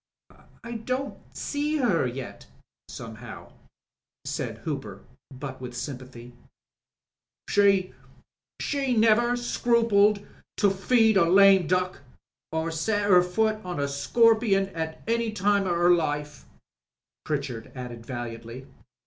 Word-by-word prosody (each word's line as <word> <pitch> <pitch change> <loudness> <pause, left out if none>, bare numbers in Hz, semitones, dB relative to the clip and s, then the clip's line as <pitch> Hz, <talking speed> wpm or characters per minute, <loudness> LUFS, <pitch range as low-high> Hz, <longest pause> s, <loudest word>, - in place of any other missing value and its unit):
"I 235 0 -5
don't 255 +4 -4 0.2
see 295 +1 -1
her 205 - +2
yet 125 +1 -8 0.4
somehow," 115 0 -9 0.7
said - - -4
Hooper, - - -5 0.3
but 130 0 -8
with 125 -1 -7
sjTnpathyj 125 -1 -7 1.2
"She 195 -2 +3 0.3
— - - -66
she 270 -4 -1
never 235 +2 +4
scrupled 230 -4 +2 0.3
to 200 -2 +3
feed 220 +2 +3
a 170 -3 +4
lame 195 -2 +6
duck 180 +1 0 0.5
or 160 +1 -2
set 205 +5 0
'er 180 -1 +8
foot 215 +4 0
on 180 -3 -5
a 140 - 0
scorpion 210 +6 +2
at 160 -3 -5
any 230 0 0
time 200 -1 +1
of 175 -1 0
'er 175 +1 +4
life," 150 -3 -2 0.8
Pritchard 135 -6 -4
added 120 -2 -7
valiantly. 120 +1 -7
185 Hz, 115 wpm, -26 LUFS, 140-220 Hz, 1.2 s, er